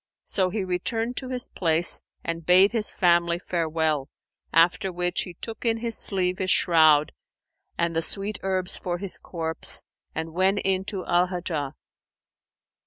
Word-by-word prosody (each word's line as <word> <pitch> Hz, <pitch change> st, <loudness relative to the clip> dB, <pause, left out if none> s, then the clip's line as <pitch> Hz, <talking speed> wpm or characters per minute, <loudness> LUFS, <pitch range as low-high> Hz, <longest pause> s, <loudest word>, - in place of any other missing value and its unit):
So 185 Hz, -2 st, 0 dB
he 200 Hz, +1 st, -3 dB
returned 225 Hz, +6 st, -2 dB
to 260 Hz, -, -5 dB
his 255 Hz, 0 st, 0 dB
place 165 Hz, -1 st, +2 dB, 0.2 s
and 165 Hz, 0 st, -4 dB
bade 185 Hz, +4 st, +5 dB
his 225 Hz, -3 st, 0 dB
family 170 Hz, -1 st, +2 dB
farewell, 160 Hz, -5 st, -1 dB, 0.4 s
after 170 Hz, +3 st, +3 dB
which 175 Hz, 0 st, -1 dB
he 180 Hz, -2 st, -7 dB
took 225 Hz, +5 st, -8 dB
in 230 Hz, -1 st, +1 dB
his 230 Hz, 0 st, -1 dB
sleeve 185 Hz, -2 st, +4 dB
his 190 Hz, -1 st, -2 dB
shroud 155 Hz, -5 st, +4 dB, 0.7 s
and 170 Hz, -1 st, -1 dB
the 165 Hz, -, +1 dB
sweet 200 Hz, +5 st, 0 dB
herbs 185 Hz, -1 st, -1 dB
for 175 Hz, -1 st, -3 dB
his 195 Hz, 0 st, -2 dB
corpse, 160 Hz, -2 st, -2 dB, 0.3 s
and 160 Hz, 0 st, -4 dB
went 190 Hz, +3 st, +2 dB
in 190 Hz, 0 st, 0 dB
to 195 Hz, -2 st, -5 dB
Al 175 Hz, +1 st, +2 dB
Hajjaj. 170 Hz, -6 st, -4 dB
180 Hz, 155 wpm, -25 LUFS, 165-195 Hz, 0.7 s, bade